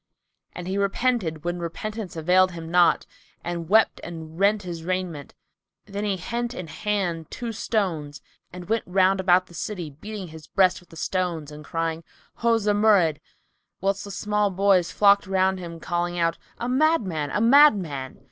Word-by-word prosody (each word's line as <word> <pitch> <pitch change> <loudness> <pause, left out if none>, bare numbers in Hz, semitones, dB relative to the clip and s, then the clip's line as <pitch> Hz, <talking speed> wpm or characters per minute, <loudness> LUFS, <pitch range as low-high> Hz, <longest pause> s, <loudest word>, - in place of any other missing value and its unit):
'" - - -47
And 180 0 -6
he 195 +2 -1
repented 200 -6 0
when 175 0 -2
repentance 205 +4 -5
availed 180 +3 +3
him 165 -1 -7
naught, 175 -1 +4 0.4
and 170 -1 -4
wept 220 +2 +4
and 160 -1 -8
rent 200 +1 +3
his 170 -2 -6
raiment. 180 -5 -4 0.5
Then 200 +1 -5
he 200 -2 0
hent 240 +6 -3
in 180 - -5
hand 175 -3 -2
two 240 -2 -5
stones 175 -10 -2 0.3
and 180 -1 -9
went 225 +1 +1
round 190 +1 +3
about 185 -1 +4
the 175 - -18
city, 175 -2 -5
beating 195 +5 -8
his 160 -1 -12
breast 185 -2 +3
with 180 - -22
the - - -14
stones 170 -3 -2
and 150 0 -10
crying 165 0 -3 0.4
"O 230 -1 +4
Zumurrud!" 205 -7 +3 0.6
whilst 195 +1 -1
the 205 - -8
small 210 +1 0
boys 190 -2 +2
flocked 200 -1 +4
round 190 0 +1
him, 170 -2 -8
calling 175 +1 -2
out, 165 -1 0 0.2
"A 240 - -3
madman! 250 - +1
A 210 - -1
madman!" 205 - +4
185 Hz, 165 wpm, -24 LUFS, 165-205 Hz, 0.6 s, naught